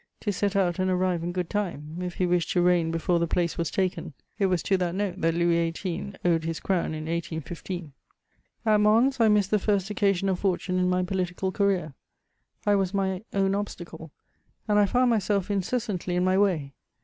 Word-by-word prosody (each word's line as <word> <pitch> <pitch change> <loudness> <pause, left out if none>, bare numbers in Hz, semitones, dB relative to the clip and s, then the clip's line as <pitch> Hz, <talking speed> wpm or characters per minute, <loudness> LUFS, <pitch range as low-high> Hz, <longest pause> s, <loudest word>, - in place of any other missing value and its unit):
to 205 - -2
set 200 +1 -1
out 185 -2 +1
and 185 0 +1
arrive 180 -2 +1
in 175 - -2
good 180 -1 -2
time, 170 -6 -3
if 180 -1 -4
he 185 - +1
wished 175 -1 +1
to 180 - +1
reign 175 -2 +3
before 165 +1 +1
the 170 - +1
place 170 -1 0
was 170 - -1
taken: 180 -4 -2 0.3
it 195 - +3
was 180 -3 0
to 195 - +2
that 180 -2 -1
note 195 -2 -2
that 165 0 +2
Louis 170 -1 +2
XVIII. 185 +3 -5
owed 165 -2 +3
his 165 0 -3
crown 180 -4 -1
in 155 - -5
1815. 165 0 -5 0.7
At 215 -1 +4
Mons, 230 +6 +3
I 225 - +5
missed 210 -2 +3
the 210 - +3
first 200 -1 0
occasion 195 -2 +1
of 185 -2 0
fortune 185 -1 0
in 180 0 +2
my 180 0 +1
political 185 0 -2
career; 185 -7 0 0.7
I 205 - +4
was 195 -1 +1
my 190 0 -1
own 195 -1 +1
obstacle, 175 -5 -5 0.6
and 210 -1 +3
I 205 - +4
found 250 +3 +3
myself 205 -2 0
incessantly 200 -3 -2
in 180 - +2
my 185 0 +3
way. 175 -9 +1
185 Hz, 200 wpm, -26 LUFS, 170-200 Hz, 0.7 s, I